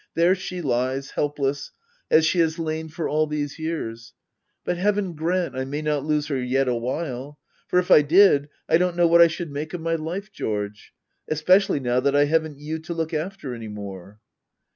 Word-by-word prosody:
There 170 +2 +4
she 180 -2 -5
lies, 130 +1 -1
helpless, 145 -1 -2 0.4
as 160 0 +5
she 175 +3 +1
has 165 0 +2
lain 160 -1 -3
for 160 +1 -3
all 155 +1 +1
these 150 0 -4
years. 115 -9 -5 0.5
But 175 - -1
heaven 200 -1 0
grant 170 +1 -1
I 130 - -2
may 145 +3 -4
not 150 -2 0
lose 150 -1 0
her 135 -3 -1
yet 130 +2 +1
awhile! 130 +3 -3 0.3
For - - +1
if 180 0 +1
I - - +9
did, 150 -2 +5 0.2
I 165 - +4
don't 180 -1 +1
know 175 - +4
what 170 0 +6
I 170 - +9
should 165 -1 -5
make 150 +4 -5
of 175 - -6
my 165 0 -1
life, 175 +6 -4
George 105 - -4 0.2
— - - -49
especially 180 +3 +3
now 125 -1 +1
that 140 +2 +1
I 145 0 +5
haven't 160 -1 0
you 155 +2 -5
to 165 +2 -6
look 165 0 -3
after 155 -3 -4
any 115 -2 -7
more. 100 -1 -9
155 Hz, 200 wpm, -24 LUFS, 135-170 Hz, 0.5 s, I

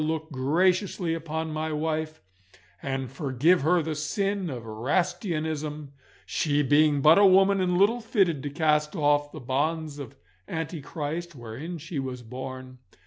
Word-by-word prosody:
look 160 +1 -2
graciously 175 +6 +1
upon 160 0 -3
my 155 +1 -2
wife, 155 -1 -2 0.6
and 135 -2 -3
forgive 140 +4 +2
her 170 +3 +3
the 160 0 -2
sin 195 +5 -1
of 120 -5 -6
Erastianism, 155 - -2 0.3
she 150 -1 +1
being 145 +1 +4
but 155 +6 +7
a 205 - +7
woman 195 +1 +5
and 180 -1 +1
little 220 +6 +3
fitted 195 - +1
to 145 - -4
cast 150 +1 +1
off 145 -2 +2
the 155 - -8
bonds 150 +4 -2
of 135 -5 -8 0.3
antichrist 160 +1 -4
wherein 130 +9 -7
she 155 -1 -5
was 130 -2 -5
born. 130 +1 -8
155 Hz, 140 wpm, -26 LUFS, 140-170 Hz, 0.6 s, but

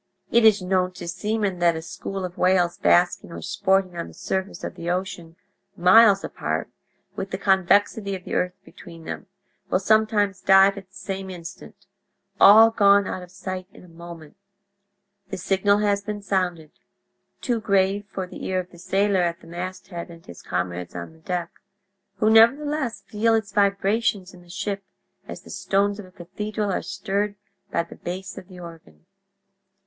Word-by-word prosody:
"It 235 0 +4
is 210 -3 +5
known 185 0 0
to 180 -1 -8
seamen 205 0 -2
that 170 -1 +3
a 160 - -4
school 195 +3 -5
of 180 0 -7
whales 180 -2 +2
basking 175 -1 +2
or - - -8
sporting 190 -2 +1
on 170 - -4
the 85 - -14
surface 190 +1 -4
of - - -4
the 170 - -6
ocean, 175 -2 -4 0.4
miles 200 +3 +6
apart, - - -3 0.4
with 190 - -4
the 190 - -3
convexity 200 +1 +2
of 185 - -9
the - - -7
earth 180 0 0
between 165 -2 -13
them, - - -6 0.4
will - - +3
sometimes 205 -1 +2
dive 195 +1 +6
at 195 -2 -10
the 190 - -24
same 195 -1 -5
instant—all 195 +3 +2
gone 200 -2 +5
out 185 - -4
of 180 - -11
sight 185 0 -6
in 230 - -15
a - - -15
moment. 170 -1 -12 0.9
The 190 - -4
signal 195 +2 +2
has 205 -1 +1
been 205 0 -6
sounded—too 185 - -4
grave 200 0 +1
for 190 -1 -5
the 180 - -10
ear 185 0 0
of 180 0 -7
the 175 - -15
sailor 195 +1 +1
at 170 0 -1
the - - -16
masthead 175 +1 -7
and 165 -1 -14
his 85 - -12
comrades 90 -1 -4
on 90 - -7
the 160 - -20
deck—who 190 +4 -6
nevertheless 260 +4 +3
feel 225 +2 +1
its 215 -3 -2
vibrations 200 -1 +1
in 180 - -14
the 175 - -20
ship 200 +1 -4 0.4
as - - -8
the - - -12
stones 200 +1 0
of 200 - -9
a - - -18
cathedral 205 +3 -4
are - - -1
stirred 200 +1 -2 0.3
by - - 0
the 170 - -13
bass 185 +2 -6
of 180 - -15
the 185 -2 -12
organ. 165 -1 -13
190 Hz, 170 wpm, -24 LUFS, 180-205 Hz, 0.9 s, miles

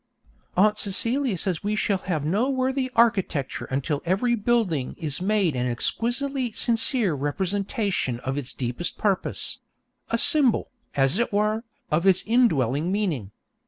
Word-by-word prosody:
Aunt 210 +3 +4
Celia 230 +3 +1
says 175 -2 -2
we 210 +1 0
shall 200 -2 0
have 160 -7 -3
no 205 - +1
worthy 260 0 0
architecture 195 - +1
until 140 +2 -2
every 195 +8 +1
building 210 - 0
is 155 -1 -4
made 195 -6 +1
an 125 0 -1
exquisitely 245 - -1
sincere 230 - +2
representation 190 - -1
of 130 +1 -3
its 140 -3 -3
deepest 125 +7 -3
purpose 200 -3 -1 0.5
a 230 - +1
symbol, 275 -2 +3 0.2
as 135 +6 +2
it 235 - 0
were, 215 +3 0 0.3
of 165 +5 +2
its 185 -1 +4
indwelling 165 - +2
meaning. 175 - -1
200 Hz, 135 wpm, -25 LUFS, 150-230 Hz, 0.5 s, Aunt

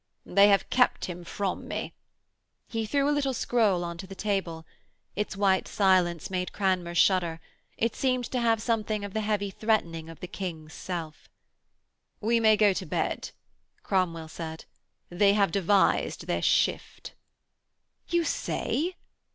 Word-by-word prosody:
'They 200 +2 +5
have 200 -1 +3
kept 250 -1 +3
him 175 -1 -7
from 190 +2 -3
me.' - - -4 0.7
He 225 -2 -3
threw 280 +4 +1
a 295 - +3
little 275 -3 0
scroll 215 -8 +2
on 170 -1 -5
to 190 - -7
the 195 - -9
table. 185 -6 -2 0.5
Its 210 -1 -3
white 195 -2 +2
silence 185 -4 +2
made 180 -1 -2
Cranmer 185 -3 0
shudder; 175 -3 +3 0.4
it 230 0 0
seemed 255 -2 0
to 255 - 0
have 230 -2 +2
something 215 -2 -1
of 200 - -8
the 220 - -1
heavy 205 -2 -1
threatening 170 -7 -1
of 165 - -11
the - - -6
King's 160 -5 -6
self. 165 -4 -6 0.9
'We 230 +2 +2
may 220 -1 +5
go 205 -2 +5
to - - -4
bed,' - - -2 0.5
Cromwell 170 -4 0
said. 160 0 -7 0.5
'They 200 +3 +4
have 200 -4 +2
devised 200 +1 +2
their - - -1
shift.' - - 0 0.9
'You 345 -1 +1
say?' 340 +2 -2
195 Hz, 150 wpm, -27 LUFS, 175-220 Hz, 0.9 s, They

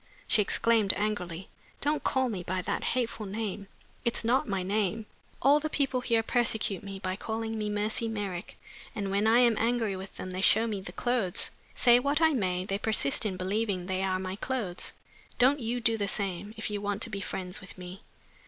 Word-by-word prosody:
She 215 - +4
exclaimed 220 0 +3
angrily, 190 -4 -2 0.3
"Don't 295 +1 0
call 260 -1 +2
me 205 -6 -3
by 185 +1 -2
that - - -2
hateful 230 -4 -2
name! 205 -1 -4 0.4
It's 235 -2 +2
not 255 +5 +2
my 195 -3 -1
name. 210 +2 0 0.4
All 285 +3 +6
the 310 +1 -3
people 270 -4 0
here 230 -2 +2
persecute 225 -4 0
me 195 -1 -6
by 185 -1 -3
calling 225 +2 -3
me 210 -1 -2
Mercy 210 +2 0
Merrick. 200 -5 -4 0.4
And 200 -3 -2
when 200 +2 +2
I 230 +2 +6
am 235 -2 +5
angry 230 -3 +1
with 190 +1 -8
them 185 - -6
they 185 +1 -3
show 220 +3 +5
me 210 -4 -3
the 190 - -7
clothes. 240 -7 +1 0.2
Say 240 -1 +6
what 280 +4 +1
I 320 -1 +4
may, 185 -7 0
they 195 0 -2
persist 215 -4 +2
in 190 -3 -4
believing 190 0 -1
they 185 0 -1
are 190 -1 +1
my 185 +1 -4
clothes. 210 -8 -3 0.5
Don't 265 +4 +5
you 240 0 -2
do 225 -1 +2
the 200 -2 -1
same, 200 +1 -2
if 220 - -2
you 205 -1 -3
want 205 +1 0
to 230 - -3
be 200 -1 -4
friends 185 -1 -4
with 195 - -11
me." 180 +2 -9
210 Hz, 200 wpm, -29 LUFS, 190-230 Hz, 0.5 s, All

